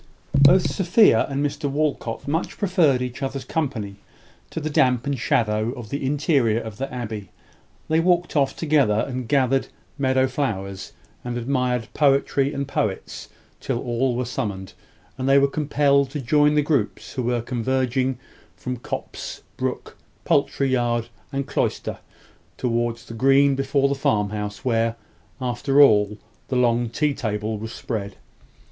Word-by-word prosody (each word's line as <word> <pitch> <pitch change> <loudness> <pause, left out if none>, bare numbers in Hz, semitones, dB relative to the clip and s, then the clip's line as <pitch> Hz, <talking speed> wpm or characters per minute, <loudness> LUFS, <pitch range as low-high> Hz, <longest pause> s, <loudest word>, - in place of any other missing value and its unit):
Both 145 +6 +5
Sophia 190 - +4
and 140 +1 -1
Mr 145 0 -2
Walcot 140 -5 -2
much 160 +4 -2
preferred 165 - +2
each 125 +2 -6
other's 135 -1 -3
company 120 -11 -3 0.5
to - - -4
the 155 0 -3
damp 125 -4 +2
and 140 0 0
shadow 110 0 +1
of 120 -5 -9
the 140 0 -3
interior 135 - +2
of 110 -3 -8
the 135 0 -4
abbey. 110 -6 -5 0.6
They 160 +1 +2
walked 175 0 +1
off 140 -2 +2
together, 140 -9 +2
and 130 -2 -4
gathered 135 -1 +2 0.3
meadow 130 -1 +3
flowers, 100 -8 -3 0.3
and 120 0 -3
admired 125 -1 -1
poetry 140 -1 +2
and 140 -2 -3
poets 105 -7 -3 0.3
till 130 -3 -2
all 120 0 0
were 125 +1 -1
summoned, 100 -7 -4 0.5
and 130 +1 0
they 135 - +6
were 140 0 +5
compelled 140 -1 +2
to 145 - -5
join 150 +3 +3
the 150 - +3
groups 140 -8 -1
who 130 - -2
were 120 -1 0
converging 130 +1 0 0.4
from 125 0 -4
copse, 120 - -6
brook, - - -4 0.3
poultry 135 -1 +1
yard, 120 -2 0 0.2
and 140 -1 -2
cloister, - - -2 0.6
towards 120 -1 -1
the - - -9
green 135 +4 +4
before 135 +1 +1
the 140 - 0
farmhouse, 105 -4 -1
where, 115 -2 +1 0.4
after 130 +2 0
all, 105 -6 +5 0.3
the 130 - -2
long 120 -1 +2
tea 150 +5 0
table 110 -3 -3
was 110 +1 -6
spread. 100 -6 -5
130 Hz, 150 wpm, -23 LUFS, 115-140 Hz, 0.6 s, they